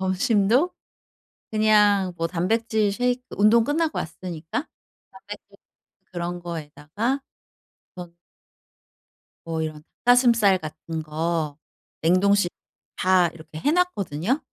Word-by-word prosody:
점심도 210 Hz, -, +2 dB, 0.8 s
그냥 210 Hz, -3 st, +3 dB
뭐 165 Hz, -, 0 dB
단백질 210 Hz, +4 st, 0 dB
셰이크 245 Hz, +2 st, 0 dB, 0.2 s
운동 220 Hz, +3 st, +5 dB
끝나고 315 Hz, +3 st, 0 dB
왔으니까 170 Hz, -, -5 dB, 0.4 s
단백질 -, -, -12 dB, 0.6 s
그런 175 Hz, 0 st, -4 dB
거에다가 170 Hz, -, -4 dB, 0.8 s
전 175 Hz, -1 st, -9 dB, 1.3 s
뭐 160 Hz, -1 st, -2 dB
이런 155 Hz, -1 st, -4 dB
닭 -, -, -38 dB, 0.2 s
가슴살 235 Hz, -6 st, +5 dB
같은 160 Hz, +1 st, -6 dB
거 155 Hz, -1 st, -2 dB, 0.4 s
냉동실 185 Hz, +2 st, +3 dB, 0.5 s
다 185 Hz, -2 st, +3 dB
이렇게 160 Hz, -1 st, -11 dB
해 290 Hz, -, +1 dB
놨거든요. 250 Hz, -, 0 dB
185 Hz, 220 characters per minute, -24 LUFS, 165-230 Hz, 1.3 s, 운동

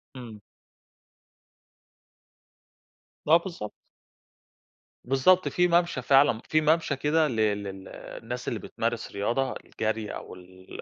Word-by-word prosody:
إمم. 115 Hz, -5 st, -10 dB, 2.9 s
آه 165 Hz, +2 st, +7 dB
بالضبط. 170 Hz, -, -7 dB, 1.3 s
بالضبط. 135 Hz, +9 st, +3 dB
في 180 Hz, 0 st, +2 dB
مَمَشى 170 Hz, -6 st, +1 dB
فعلًا، 135 Hz, -3 st, +4 dB
في 155 Hz, 0 st, +3 dB
مَمَشى 155 Hz, -1 st, +2 dB
كده 150 Hz, +3 st, +2 dB
لل 110 Hz, -4 st, 0 dB
لل 95 Hz, -1 st, -8 dB
الناس 125 Hz, +2 st, -8 dB
اللي -, -, -2 dB
بتمارس -, -, -3 dB
رياضة 120 Hz, +6 st, -1 dB
الجري 110 Hz, -1 st, -4 dB
أو -, -, -8 dB
ال 95 Hz, +1 st, -12 dB
125 Hz, 105 wpm, -27 LUFS, 105-155 Hz, 2.9 s, آه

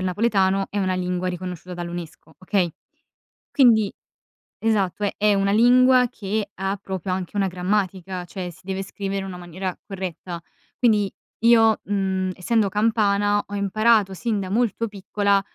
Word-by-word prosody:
il 185 Hz, -, -1 dB
napoletano, 195 Hz, -1 st, +1 dB
è 205 Hz, -, -2 dB
una 185 Hz, -1 st, +1 dB
lingua 180 Hz, 0 st, -1 dB
riconosciuta 180 Hz, 0 st, -6 dB
dall'UNESCO, 170 Hz, -2 st, -7 dB
okay. 185 Hz, -2 st, 0 dB, 0.8 s
Quindi 225 Hz, -7 st, +5 dB, 0.7 s
Esatto 210 Hz, -3 st, +1 dB
è 200 Hz, -, -1 dB
è 210 Hz, 0 st, +3 dB
una 195 Hz, 0 st, +2 dB
lingua 250 Hz, +2 st, +5 dB
che 210 Hz, -2 st, -3 dB
ha 195 Hz, +1 st, -2 dB
proprio 190 Hz, -2 st, -4 dB
anche 185 Hz, +1 st, -4 dB
una 195 Hz, -1 st, +2 dB
grammatica, 185 Hz, 0 st, -2 dB
cioè 180 Hz, 0 st, -6 dB
si 180 Hz, +2 st, -17 dB
deve 190 Hz, 0 st, -3 dB
scrivere 195 Hz, 0 st, -4 dB
in 195 Hz, -, -5 dB
una 185 Hz, -2 st, -7 dB
maniera 180 Hz, +1 st, -5 dB
corretta. 180 Hz, -3 st, -6 dB, 0.3 s
Quindi 210 Hz, -5 st, +2 dB, 0.3 s
io, 225 Hz, -2 st, +6 dB
mhmm, 190 Hz, -2 st, -1 dB
essendo 210 Hz, +3 st, +1 dB
campana 205 Hz, -1 st, +2 dB
ho 205 Hz, -, -8 dB
imparato 205 Hz, 0 st, +2 dB
sin 215 Hz, +1 st, -1 dB
da 185 Hz, -1 st, -5 dB
molto 230 Hz, +1 st, 0 dB
piccola 200 Hz, 0 st, +1 dB
195 Hz, 150 wpm, -23 LUFS, 185-210 Hz, 0.8 s, io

